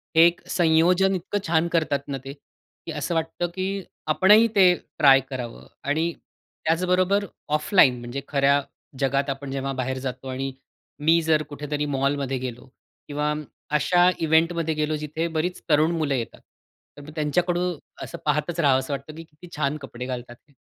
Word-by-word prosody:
हे 165 +1 +8
एक 175 - -2
संयोजन 180 +3 +3
इतकं 195 +3 -2
छान 165 +1 +2
करतात 155 -4 +1
ना 140 -1 -3
ते, 135 - -6
की 140 - -15
असं 170 - -3
वाटतं 165 +2 -1
की 190 +1 -2 0.3
आपणही 210 +6 +6
ते 185 -2 +7 0.3
ट्राय 135 -2 +7
करावं 125 -3 -6 0.2
आणि 160 +4 0 0.5
त्याचबरोबर 185 +4 +2 0.3
ऑफलाईन 150 -6 +4
म्हणजे 120 +3 -5
खऱ्या 140 0 +3 0.4
जगात 140 +1 +1
आपण 135 0 -4
जेव्हा 135 0 -2
बाहेर 130 0 -2
जातो 130 0 -5
आणि 135 +1 -3 0.5
मी 165 +2 +5
जर 155 -1 +2
कुठेतरी 150 +1 -3
मॉलमध्ये 140 -1 -1
गेलो 125 -1 -6 0.4
किंवा 150 +1 -1 0.4
अशा 175 +5 +4
इव्हेंटमध्ये 165 0 +2
गेलो, 155 0 0
जिथे 150 +2 -3
बरीच 165 +3 -2
तरुण 155 +2 +4
मुलं 150 -3 0
येतात. 115 -2 -5 0.6
तर 145 +1 -11
त्यांच्याकडून 175 +3 0 0.3
असं - - -7
पाहतच 150 +3 0
राहावंसं 135 -2 +2
वाटतं 140 +3 -6
की 165 - -8
किती 160 +3 -16
छान 150 0 0
कपडे 125 -1 -7
घालतात 125 -1 -6
ते. 140 +4 -31
150 Hz, 155 wpm, -24 LUFS, 135-170 Hz, 0.6 s, हे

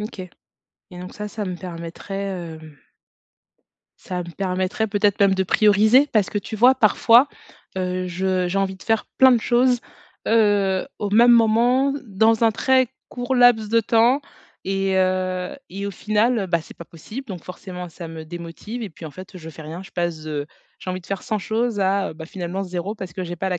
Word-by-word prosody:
OK 210 -2 -6 0.7
et 180 - -9
donc 180 - -8
ça, 210 0 -6
ça 210 -1 -5
me 180 -1 -4
permettrait, 175 +2 -7 0.4
hem 155 -2 -14 1.2
ça 180 -1 -5
me 170 -1 -6
permettrait 190 +4 -1
peut-être 205 -1 +1
même 195 -1 +5
de 190 - +1
prioriser 215 +8 +4
parce 215 -4 +2
que, 205 - -1
tu 205 - -7
vois 250 +4 +5
parfois, 230 +3 +5 0.5
heu, 185 0 -2
je 185 0 -1
j'ai 185 +3 -2
envie 190 -1 -1
de - - -15
faire 225 -1 +1
plein 260 -1 +8
de 235 - +3
choses, 245 +1 +2 0.5
heu, 205 -4 +2
au 205 -1 -2
même 240 +3 +6
moment, 240 +4 +4
dans 220 +2 +2
un 225 - +4
très 260 +2 +3 0.2
court 245 +1 -3
laps 245 -4 +5
de 230 +1 +3
temps 235 +5 +3 0.4
et 195 0 0
heu 185 0 0
et 200 +2 -6
au - - -3
final, 215 +2 +1
bah, 170 -2 +1
c'est - - -14
pas 170 - -9
possible. 215 - -9
Donc 185 -6 -7
forcément, 180 -1 -8
ça 170 +1 -9
me 160 -1 -8
démotive 175 +8 -7
et - - -5
puis 160 - -12
en 155 - -6
fait, 185 +3 -11
je 160 -2 -9
fais 160 0 -11
rien. 165 +5 -7
Je 195 - -14
passe 170 -3 -2
de 150 -2 -4 0.3
j'ai 185 - -5
envie 185 - -4
de 175 - -18
faire 195 -1 -4
100 215 -4 -2
choses 220 0 -1
à, 195 -3 +1
bah, 160 0 -8
finalement 180 +2 -5
0 185 +3 -4
parce 190 -5 -8
que 185 +1 -4
j'ai 175 0 -5
pas 190 +3 -3
la 180 -1 -1
195 Hz, 200 wpm, -22 LUFS, 180-225 Hz, 1.2 s, plein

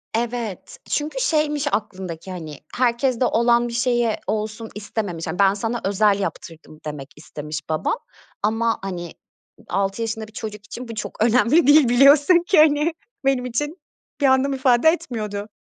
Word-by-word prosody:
Evet, 235 -4 -3
çünkü 305 +11 -2
şeymiş 300 - +1
aklındaki, 190 -4 -4
hani, 155 -5 -7 0.2
herkeste 250 0 +1
olan 235 +1 +3
bir 235 - -6
şeyi 240 -2 +1
olsun 215 +1 -3
istememiş. 200 -5 -4
Ben 195 0 +5
sana 225 +3 -3
özel 200 0 +3
yaptırdım 160 -5 -6
demek 145 -2 -6
istemiş 150 0 -7
babam 155 - 0 0.5
ama, 225 +2 +1
hani, 180 -3 -5 0.6
6 195 +3 -1
yaşında 220 -1 -3
bir 215 - -18
çocuk 210 -2 -7
için 245 +3 -8
bu 230 - -7
çok 215 0 -3
önemli 255 +7 +4
değil 290 -4 +6
biliyorsun 285 +7 +6
ki 375 - +3
hani. 305 +1 +4 0.3
Benim 260 -2 +2
için 295 +8 -3 0.4
bir - - +3
anlam 265 +1 +3
ifade 260 +2 +4
etmiyordu. 215 -10 -3
230 Hz, 145 wpm, -22 LUFS, 200-265 Hz, 0.6 s, değil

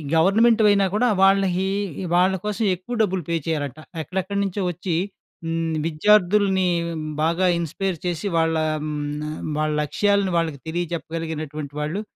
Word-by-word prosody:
గవర్నమెంట్‌వి 215 +6 +4
అయినా 200 -1 +3
కూడా 245 +4 +3
వాళ్ళహి 195 -1 +3 0.3
ఈ - - -4
వాళ్ళ 185 +2 +4
కోసం 210 +2 -1
ఎక్కువ 185 +8 -6
డబ్బులు 190 -4 +1
పే 170 - +1
చేయాలట. 150 -3 -2 0.2
ఎక్కడెక్కడి 190 +4 -3
నుంచో 200 +1 -2
వచ్చి 175 0 -3 0.5
హ్మ్. 165 0 -1
విద్యార్థుల్ని 190 +3 +3 0.6
బాగా 170 +3 +2
ఇన్‌స్పైర్ 170 +3 -2
చేసి 175 +3 -2
వాళ్ళ 165 0 +2 0.3
హ్మ్. 150 0 -4
వాళ్ళ 155 0 0
లక్ష్యాలను 200 +4 +1
వాళ్ళకి 160 -4 -1
తెలియజెప్పగలిగినటువంటి 160 -3 -4
వాళ్ళు. 155 +7 -2
175 Hz, 130 wpm, -23 LUFS, 160-195 Hz, 0.6 s, గవర్నమెంట్‌వి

